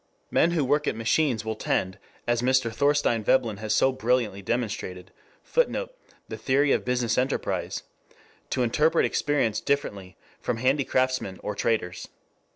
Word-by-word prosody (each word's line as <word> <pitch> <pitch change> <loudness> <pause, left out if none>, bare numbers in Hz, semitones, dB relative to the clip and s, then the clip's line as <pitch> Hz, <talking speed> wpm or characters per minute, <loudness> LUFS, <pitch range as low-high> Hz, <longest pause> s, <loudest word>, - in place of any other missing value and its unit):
Men 165 - +4
who 165 -5 +1
work 150 +3 +1
at - - 0
machines 115 0 +1
will 110 - -1
tend, 95 -2 -1 0.3
as 120 0 +1
Mr. 130 -2 +2
Thorstein 140 -4 +2
Veblen 115 -2 +2
has 110 +1 -4
so 135 - +4
brilliantly 120 -5 0
demonstrated, 100 -5 -3 0.3
[Footnote: - - 0 0.3
The - - -6
Theory 140 +2 +2
of - - +2
Business 125 -1 0
Enterprise.] 130 +2 -2 0.7
to 125 - 0
interpret 150 +8 +3
experience 135 -7 0
differently 100 -10 -2 0.2
from 120 - -2
handicraftsmen 130 -5 0
or 105 - -2
traders. 100 -5 -1
125 Hz, 140 wpm, -26 LUFS, 110-140 Hz, 0.7 s, Men